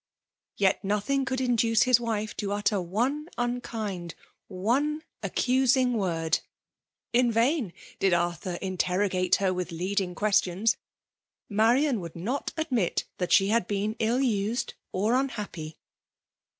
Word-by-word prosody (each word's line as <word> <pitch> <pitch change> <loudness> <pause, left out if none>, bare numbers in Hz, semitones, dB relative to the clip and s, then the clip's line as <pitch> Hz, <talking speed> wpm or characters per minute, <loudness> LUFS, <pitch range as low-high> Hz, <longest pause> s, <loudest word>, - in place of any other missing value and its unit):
• - - -67 0.5
Yet 195 -1 +2
nothing 210 +7 0
could 260 -1 -1
induce 235 -3 +3
his 250 -2 +5
wife 220 -2 -2
to 200 -1 -2
utter 205 -1 +1
one 250 - -1
unkind 225 -7 -3 0.3
— - - -59
one 265 +11 0 0.2
accusing 255 +4 +2
word! 165 -7 0 0.7
In 240 0 +4
vain 235 - +1 0.3
did 195 - +3
Arthur 175 +1 0
interrogate 185 0 +1
her 190 -2 +1
with 180 -1 -3
leading 180 +2 -2
ques* 210 +1 +3
tions; 195 +6 0 0.7
Marian 235 +5 +3
would 170 -3 -8
not 230 +12 -3
admit 250 - 0
that 180 - -2
she 195 0 +5
had 225 -3 +2
been 205 +2 -1
ill 235 +4 +1
used 225 -2 0 0.2
or 210 +5 +1
unhappy. 210 -12 -3
210 Hz, 135 wpm, -27 LUFS, 185-245 Hz, 0.7 s, his